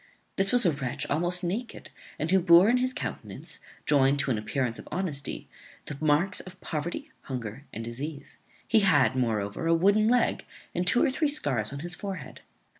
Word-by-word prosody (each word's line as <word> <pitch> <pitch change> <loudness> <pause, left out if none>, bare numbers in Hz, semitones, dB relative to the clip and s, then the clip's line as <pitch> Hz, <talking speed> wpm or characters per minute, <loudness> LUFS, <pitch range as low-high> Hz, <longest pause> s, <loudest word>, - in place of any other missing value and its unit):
This 195 0 +1
was 245 -3 +6
a 170 - +5
wretch 135 -4 -3
almost 175 +4 +1
naked, 215 +7 -4 0.3
and 155 +3 -2
who 190 - +5
bore 170 +1 +6
in 245 - +4
his 255 +1 +1
countenance, - - -6 0.3
joined 140 -1 +3
to 140 -1 +1
an 115 - +1
appearance 115 +2 -2
of - - -11
honesty, 165 -7 -3 0.4
the 145 - -6
marks 155 +5 +2
of 185 0 -10
poverty, 175 - -5
hunger, 125 0 -6
and 115 +1 -6
disease. 140 +6 -7 0.3
He 225 - +4
had, 195 -9 +4
moreover, 110 +3 -1
a 165 - +4
wooden 200 +5 +3
leg, 245 +1 +1 0.3
and 180 +1 -2
two 245 - +5
or - - +2
three 300 +2 +1
scars 130 - -1
on 140 0 -6
his 175 +2 -1
forehead. 185 -5 -7
165 Hz, 185 wpm, -27 LUFS, 135-195 Hz, 0.4 s, was